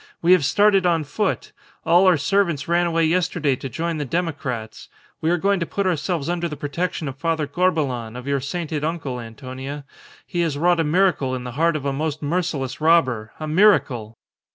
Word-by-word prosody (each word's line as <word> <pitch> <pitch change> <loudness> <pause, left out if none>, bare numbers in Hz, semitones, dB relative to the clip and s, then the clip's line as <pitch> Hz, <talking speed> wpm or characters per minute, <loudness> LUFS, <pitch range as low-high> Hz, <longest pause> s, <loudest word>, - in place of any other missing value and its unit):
"We 170 - +2
have 185 -5 +6
started 200 +5 +4
on 165 -2 +2
foot. 190 +8 -2 0.3
All 175 +3 +5
our 180 -3 +5
servants 170 -3 0
ran 175 +1 +2
away 165 -1 +2
yesterday 170 -4 +1
to 135 - -6
join 165 +4 -3
the - - -1
democrats. 135 -8 -4 0.3
We 160 - +1
are 175 - +3
going 195 +2 +1
to 170 - -1
put 200 - -2
ourselves 170 -3 -1
under 175 0 -1
the 150 - -6
protection 160 +2 -3
of 135 0 -6
Father 160 -1 0
Corbelan, 145 -8 -1
of 125 0 -7
your 140 0 0
sainted 155 +1 -3
uncle, 150 -6 -3
Antonia. 130 +4 -8 0.4
He 175 - -2
has 160 -4 -1
wrought 175 +2 +3
a - - +3
miracle 155 -5 +2
in 125 - -5
the 125 - -6
heart 165 +5 +1
of 145 -2 -4
a 140 - 0
most 155 +1 -3
merciless 145 -5 -2
robber. 130 -10 +3
A 155 - -4
miracle!" 150 - +2
155 Hz, 195 wpm, -22 LUFS, 135-175 Hz, 0.4 s, have